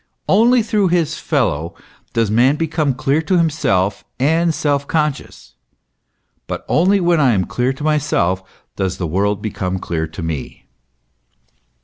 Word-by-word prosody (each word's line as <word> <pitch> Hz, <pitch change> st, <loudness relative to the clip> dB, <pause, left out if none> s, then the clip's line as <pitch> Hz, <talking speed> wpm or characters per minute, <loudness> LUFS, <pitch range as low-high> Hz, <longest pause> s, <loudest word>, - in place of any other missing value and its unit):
Only 235 Hz, +4 st, +4 dB
through 210 Hz, -3 st, +1 dB
his 165 Hz, -3 st, 0 dB
fellow 85 Hz, -, -1 dB, 0.4 s
does 115 Hz, -3 st, +1 dB
man 125 Hz, +6 st, +4 dB
become 155 Hz, -3 st, -1 dB
clear 145 Hz, +3 st, +1 dB
to 180 Hz, +3 st, +1 dB
himself 145 Hz, -, +1 dB, 0.2 s
and 165 Hz, +5 st, +2 dB
self 145 Hz, -2 st, -1 dB
conscious; 150 Hz, -, -3 dB, 0.9 s
but -, -, -5 dB
only 190 Hz, +5 st, +3 dB
when 175 Hz, -2 st, +2 dB
I 130 Hz, -5 st, +4 dB
am 95 Hz, -3 st, +1 dB
clear 125 Hz, +1 st, -1 dB
to 135 Hz, -, -9 dB
myself, 135 Hz, -, +1 dB, 0.3 s
does 95 Hz, -1 st, -2 dB
the 90 Hz, -, -3 dB
world 100 Hz, +5 st, -1 dB
become 95 Hz, -3 st, -3 dB
clear 80 Hz, -3 st, -3 dB
to 80 Hz, +2 st, -8 dB
me. 80 Hz, -4 st, -5 dB
140 Hz, 140 wpm, -18 LUFS, -, 0.9 s, Only